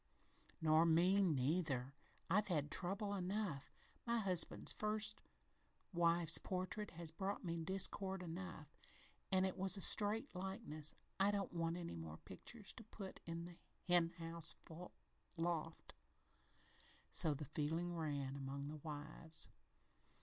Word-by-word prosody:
"Nor 155 Hz, +1 st, +6 dB
me, 180 Hz, +5 st, +5 dB
neither. 145 Hz, -4 st, +1 dB, 0.3 s
I've 210 Hz, +4 st, +2 dB
had 150 Hz, -6 st, 0 dB
trouble 200 Hz, +3 st, 0 dB
enough. 185 Hz, -7 st, -2 dB, 0.3 s
My 235 Hz, 0 st, +1 dB
husband's 185 Hz, -6 st, +2 dB
first 215 Hz, 0 st, +1 dB, 0.7 s
wife's 170 Hz, -1 st, +3 dB
portrait 185 Hz, +3 st, -3 dB
has 170 Hz, -2 st, -4 dB
brought 195 Hz, +4 st, -3 dB
me 170 Hz, -1 st, -2 dB
discord 190 Hz, +2 st, +2 dB
enough 170 Hz, -3 st, -7 dB, 0.6 s
an' 190 Hz, 0 st, +4 dB
it 190 Hz, -, -1 dB
was 190 Hz, 0 st, +5 dB
a -, -, -4 dB
straight 215 Hz, +7 st, +6 dB
likeness. 180 Hz, -5 st, -2 dB, 0.2 s
I 195 Hz, +1 st, +5 dB
don't 200 Hz, -1 st, -1 dB
want 165 Hz, 0 st, -1 dB
any 170 Hz, -1 st, -5 dB
more 80 Hz, -1 st, -7 dB
pictures 205 Hz, -, -7 dB
to 230 Hz, -, -8 dB
put 200 Hz, -3 st, -8 dB
in 165 Hz, 0 st, -4 dB
the 175 Hz, -1 st, -11 dB, 0.3 s
hen 175 Hz, -2 st, +5 dB
house 165 Hz, -1 st, -2 dB, 0.8 s
loft." 165 Hz, -1 st, -2 dB, 1.2 s
So 155 Hz, -3 st, +5 dB
the 150 Hz, +2 st, -5 dB
feeling 160 Hz, +4 st, -1 dB
ran 145 Hz, -4 st, -2 dB
among 140 Hz, +1 st, -4 dB
the 155 Hz, -, -6 dB
wives. 155 Hz, +2 st, -4 dB
170 Hz, 130 wpm, -41 LUFS, 155-195 Hz, 1.2 s, Nor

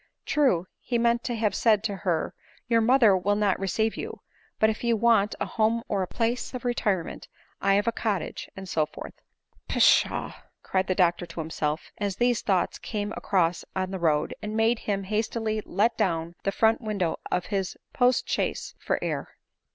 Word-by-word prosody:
" -, -, -55 dB
True," 255 Hz, -, +3 dB
he 240 Hz, -, -1 dB
meant 235 Hz, 0 st, +2 dB
to 240 Hz, -, -1 dB
have 215 Hz, -3 st, +1 dB
said 215 Hz, 0 st, +3 dB
to 200 Hz, -2 st, -2 dB
her, 175 Hz, -4 st, -1 dB, 0.2 s
" -, -, -31 dB
your 230 Hz, -1 st, +3 dB
mother 230 Hz, -3 st, +5 dB
will 195 Hz, +3 st, +1 dB
not 205 Hz, -2 st, +1 dB
receive 220 Hz, +3 st, 0 dB
you; -, -, -6 dB, 0.4 s
but 220 Hz, -, +4 dB
if 220 Hz, +1 st, -2 dB
you 235 Hz, -1 st, +3 dB
ever 220 Hz, -, -6 dB
want 215 Hz, -3 st, +4 dB
a -, -, 0 dB
home 230 Hz, +1 st, +1 dB
or 200 Hz, -2 st, 0 dB
a 185 Hz, -, -1 dB
place 235 Hz, +4 st, -2 dB
of 250 Hz, -, -6 dB
retirement, 205 Hz, -7 st, -1 dB, 0.3 s
I 195 Hz, 0 st, +3 dB
have 205 Hz, +1 st, +2 dB
a -, -, +4 dB
cottage, 215 Hz, -4 st, -3 dB
and 190 Hz, 0 st, -7 dB
so 155 Hz, -4 st, +1 dB
forth." -, -, -9 dB, 0.3 s
" -, -, -36 dB
Pshaw! -, -, +3 dB, 0.2 s
" -, -, -49 dB
cried 190 Hz, 0 st, 0 dB
the 185 Hz, -, +1 dB
doctor 175 Hz, -1 st, +2 dB
to 170 Hz, 0 st, -8 dB
himself, 155 Hz, -1 st, -3 dB
as 200 Hz, -2 st, -1 dB
these 245 Hz, +1 st, +2 dB
thoughts 190 Hz, -4 st, 0 dB
came 205 Hz, -1 st, -3 dB
across 180 Hz, -5 st, +1 dB
him -, -, -17 dB
on 185 Hz, 0 st, -1 dB
the 190 Hz, -, -4 dB
road, 155 Hz, -3 st, +1 dB
and 215 Hz, +1 st, -4 dB
made 225 Hz, +1 st, +3 dB
him 200 Hz, -2 st, -2 dB
hastily 215 Hz, +1 st, -1 dB
let 225 Hz, +3 st, +1 dB
down 170 Hz, -5 st, 0 dB
the 195 Hz, -, +2 dB
front 225 Hz, +4 st, +3 dB
window 200 Hz, -7 st, -1 dB
' -, -, -9 dB
of 180 Hz, -, -1 dB
the 195 Hz, -2 st, -1 dB, 0.2 s
postchaise 250 Hz, 0 st, +1 dB
for -, -, 0 dB
air. -, -, -4 dB
205 Hz, 205 wpm, -26 LUFS, 185-230 Hz, 0.4 s, mother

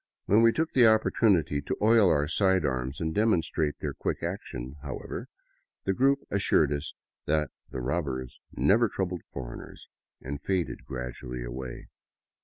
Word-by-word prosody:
When 105 Hz, +3 st, +5 dB
we 115 Hz, 0 st, +6 dB
took 160 Hz, +6 st, -1 dB
the 125 Hz, -3 st, +6 dB
opportunity 100 Hz, -9 st, +3 dB
to -, -, -3 dB
oil 110 Hz, -2 st, +5 dB
our 75 Hz, -2 st, +2 dB
side 95 Hz, +1 st, +2 dB
arms 65 Hz, 0 st, -2 dB
and 80 Hz, -1 st, -1 dB
demonstrate 80 Hz, -8 st, +1 dB
their -, -, -4 dB
quick -, -, -3 dB
action, 65 Hz, +4 st, -5 dB
however, 70 Hz, -5 st, -6 dB, 0.6 s
the 95 Hz, -, +1 dB
group 135 Hz, +5 st, +3 dB
assured 80 Hz, -7 st, +3 dB
us 70 Hz, 0 st, -5 dB, 0.3 s
that 75 Hz, -4 st, +1 dB, 0.2 s
the 65 Hz, -, -5 dB
robbers 65 Hz, -2 st, -3 dB
never 115 Hz, +3 st, +3 dB
troubled 90 Hz, -3 st, -3 dB
foreigners, -, -, -8 dB, 0.3 s
and 70 Hz, +2 st, -6 dB
faded 95 Hz, +1 st, -2 dB
gradually 60 Hz, -1 st, -5 dB
away. 60 Hz, +1 st, -7 dB
80 Hz, 145 wpm, -28 LUFS, 65-100 Hz, 0.6 s, we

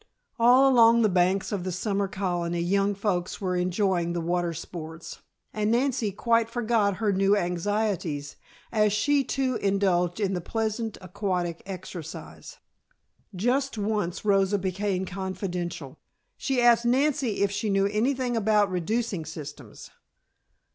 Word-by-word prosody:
All 250 Hz, +3 st, +6 dB
along 235 Hz, -3 st, +6 dB
the 215 Hz, -, +4 dB
banks 185 Hz, +1 st, +1 dB
of 200 Hz, -4 st, -2 dB
the 185 Hz, -, -3 dB
summer 200 Hz, +2 st, -1 dB
colony 175 Hz, -3 st, -2 dB
young 195 Hz, +3 st, +1 dB
folks 190 Hz, -3 st, -2 dB
were 185 Hz, -2 st, -1 dB
enjoying 180 Hz, -1 st, 0 dB
the 175 Hz, -, -1 dB
water 175 Hz, +1 st, -1 dB
sports, 165 Hz, 0 st, -8 dB, 0.3 s
and 210 Hz, 0 st, 0 dB
Nancy 235 Hz, -2 st, +1 dB
quite 230 Hz, +3 st, +1 dB
forgot 225 Hz, -4 st, +1 dB
her 210 Hz, 0 st, 0 dB
new 195 Hz, +2 st, +3 dB
anxieties 175 Hz, -5 st, -2 dB, 0.4 s
as 210 Hz, -2 st, +2 dB
she 280 Hz, +7 st, +2 dB
too 260 Hz, -1 st, -1 dB
indulged 190 Hz, -2 st, +1 dB
in 195 Hz, -2 st, 0 dB
the 180 Hz, -, -2 dB
pleasant 220 Hz, +3 st, -3 dB
aquatic 180 Hz, -2 st, -3 dB
exercise. 180 Hz, -4 st, -8 dB, 0.8 s
Just 250 Hz, +6 st, 0 dB
once 210 Hz, -3 st, -2 dB
Rosa 195 Hz, 0 st, +3 dB
became 190 Hz, 0 st, -2 dB
confidential. 180 Hz, -6 st, -5 dB, 0.4 s
She 265 Hz, -2 st, -1 dB
asked 240 Hz, -1 st, +5 dB
Nancy 255 Hz, -3 st, +1 dB
if 200 Hz, -, +1 dB
she 205 Hz, +1 st, -2 dB
knew 195 Hz, 0 st, +2 dB
anything 245 Hz, +4 st, 0 dB
about 210 Hz, -2 st, +2 dB
reducing 195 Hz, +1 st, -1 dB
systems. 145 Hz, -6 st, -9 dB
200 Hz, 135 wpm, -26 LUFS, 180-225 Hz, 0.8 s, All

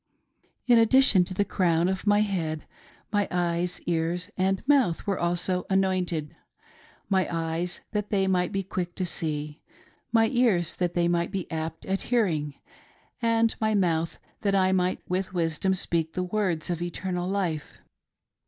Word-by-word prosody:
In 240 Hz, -2 st, +6 dB
addition 225 Hz, -5 st, +5 dB
to 185 Hz, -, -6 dB
the 205 Hz, -, +1 dB
crown 170 Hz, -3 st, +1 dB
of 190 Hz, +2 st, -2 dB
my 205 Hz, 0 st, +5 dB
head, 165 Hz, -7 st, -2 dB, 0.5 s
my 205 Hz, -1 st, +2 dB
eyes, 175 Hz, 0 st, -1 dB
ears 170 Hz, +1 st, -1 dB
and 190 Hz, +5 st, 0 dB
mouth 265 Hz, -, +3 dB
were 195 Hz, -2 st, -1 dB
also 175 Hz, +1 st, 0 dB
anointed; 185 Hz, -5 st, 0 dB, 0.7 s
my 190 Hz, -2 st, +2 dB
eyes 165 Hz, +1 st, -2 dB
that 210 Hz, -1 st, -2 dB
they 195 Hz, -2 st, +2 dB
might 180 Hz, -2 st, +1 dB
be 195 Hz, 0 st, -1 dB
quick 175 Hz, -2 st, -4 dB
to 185 Hz, -, -1 dB
see, 150 Hz, -3 st, -2 dB, 0.5 s
my 225 Hz, -1 st, +4 dB
ears 215 Hz, -, +2 dB
that 175 Hz, -1 st, -1 dB
they 170 Hz, -1 st, +2 dB
might 170 Hz, 0 st, +1 dB
be 195 Hz, -3 st, -3 dB
apt 160 Hz, 0 st, -4 dB
at 195 Hz, 0 st, -1 dB
hearing, 165 Hz, -, +1 dB, 0.7 s
and 230 Hz, -1 st, +3 dB
my 220 Hz, -1 st, +2 dB
mouth 170 Hz, -4 st, +1 dB, 0.2 s
th^t 200 Hz, -2 st, +1 dB
I 185 Hz, -1 st, +3 dB
might 185 Hz, -1 st, 0 dB
with 185 Hz, +1 st, -2 dB
wisdom 170 Hz, +3 st, +1 dB
speak 165 Hz, -3 st, -1 dB
the 185 Hz, -, -1 dB
words 180 Hz, -3 st, -1 dB
of 175 Hz, -1 st, -3 dB
eternal 180 Hz, +1 st, -3 dB
life. 180 Hz, -6 st, -2 dB
180 Hz, 155 wpm, -26 LUFS, 170-195 Hz, 0.7 s, In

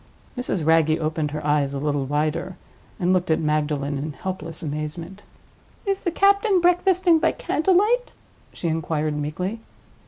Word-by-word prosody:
Mrs. 195 Hz, -, -2 dB
Wragge 160 Hz, -1 st, +4 dB
opened 155 Hz, -1 st, -1 dB
her 150 Hz, 0 st, -5 dB
eyes 145 Hz, -2 st, +1 dB
a -, -, -2 dB
little 145 Hz, -1 st, -1 dB
wider, 155 Hz, +6 st, -2 dB, 0.4 s
and 180 Hz, +1 st, +2 dB
looked 180 Hz, -1 st, 0 dB
at 160 Hz, -, +3 dB
Magdalen 150 Hz, -2 st, -1 dB
in 150 Hz, +2 st, -4 dB
helpless 175 Hz, -2 st, -6 dB
amazement. 155 Hz, +5 st, -5 dB, 0.6 s
"Is 390 Hz, -1 st, 0 dB
the 350 Hz, -, 0 dB
captain 400 Hz, +2 st, +3 dB
breakfasting 355 Hz, -1 st, +3 dB
by 325 Hz, -, +2 dB
candle 360 Hz, +5 st, +1 dB
light?" 480 Hz, +6 st, +3 dB, 0.4 s
she 170 Hz, -, -5 dB
inquired, 155 Hz, -1 st, -1 dB
meekly. 175 Hz, +9 st, -3 dB
160 Hz, 150 wpm, -23 LUFS, -, 0.6 s, Wragge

